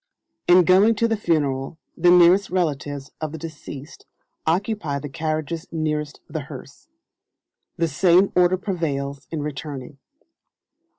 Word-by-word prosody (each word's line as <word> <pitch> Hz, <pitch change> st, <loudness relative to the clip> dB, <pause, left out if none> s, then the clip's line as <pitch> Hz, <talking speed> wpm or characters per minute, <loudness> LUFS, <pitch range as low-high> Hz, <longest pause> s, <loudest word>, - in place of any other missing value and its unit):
In 180 Hz, +1 st, +7 dB
going 195 Hz, +6 st, +5 dB
to 230 Hz, +2 st, +2 dB
the 225 Hz, -, +1 dB
Funeral 145 Hz, -7 st, -1 dB, 0.2 s
the 175 Hz, +1 st, +3 dB
nearest 180 Hz, +3 st, +6 dB
relatives 145 Hz, -6 st, -2 dB
of 155 Hz, -1 st, -3 dB
the -, -, -5 dB
deceased 150 Hz, -2 st, -9 dB, 0.4 s
occupy 170 Hz, -3 st, 0 dB
the 145 Hz, +1 st, -6 dB
carriages 155 Hz, +2 st, -3 dB
nearest 150 Hz, -2 st, -2 dB
the -, -, -4 dB
hearse. -, -, -11 dB, 0.9 s
The 165 Hz, -, +1 dB
same 180 Hz, +5 st, +4 dB
order 180 Hz, +1 st, +4 dB
prevails 140 Hz, -8 st, -3 dB
in 155 Hz, -3 st, -3 dB
returning. 145 Hz, -2 st, -6 dB
160 Hz, 125 wpm, -23 LUFS, 145-180 Hz, 0.9 s, In